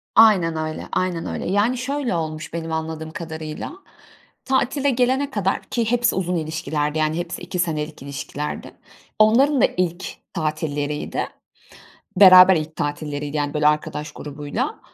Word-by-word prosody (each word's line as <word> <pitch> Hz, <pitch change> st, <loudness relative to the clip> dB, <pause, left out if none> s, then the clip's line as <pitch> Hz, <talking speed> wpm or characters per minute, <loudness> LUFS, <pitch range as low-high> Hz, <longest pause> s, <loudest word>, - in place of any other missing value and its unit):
Aynen 195 Hz, -7 st, +6 dB
öyle, 155 Hz, 0 st, -4 dB
aynen 180 Hz, -2 st, -1 dB
öyle. -, -, -4 dB
Yani, 210 Hz, +6 st, +2 dB
şöyle 260 Hz, -4 st, -2 dB
olmuş, 155 Hz, -1 st, -4 dB
benim 165 Hz, -1 st, -4 dB
anladığım 160 Hz, 0 st, -4 dB
kadarıyla; 160 Hz, -, -6 dB, 0.7 s
tatile 270 Hz, +2 st, +1 dB
gelene 260 Hz, +2 st, +1 dB
kadar, 195 Hz, -5 st, 0 dB
ki 230 Hz, -2 st, -1 dB
hepsi 240 Hz, -1 st, +2 dB
uzun 180 Hz, -1 st, -1 dB
ilişkilerdi, 155 Hz, -1 st, -2 dB
yani, 155 Hz, +1 st, +1 dB
hepsi 175 Hz, 0 st, -4 dB
2 180 Hz, -, -5 dB
senelik 155 Hz, -3 st, -2 dB
ilişkilerdi. 140 Hz, +1 st, -5 dB, 0.5 s
Onların 250 Hz, +5 st, +5 dB
da -, -, +7 dB
ilk 180 Hz, +1 st, -1 dB, 0.3 s
tatilleriydi. 150 Hz, -3 st, -2 dB, 0.9 s
Beraber 185 Hz, -1 st, +9 dB
ilk 155 Hz, 0 st, -4 dB
tatilleriydi, 145 Hz, 0 st, -3 dB
yani, 145 Hz, 0 st, -1 dB
böyle 150 Hz, 0 st, +2 dB
arkadaş 150 Hz, 0 st, -2 dB
grubuyla. 145 Hz, 0 st, -4 dB
165 Hz, 135 wpm, -22 LUFS, 155-205 Hz, 0.9 s, Beraber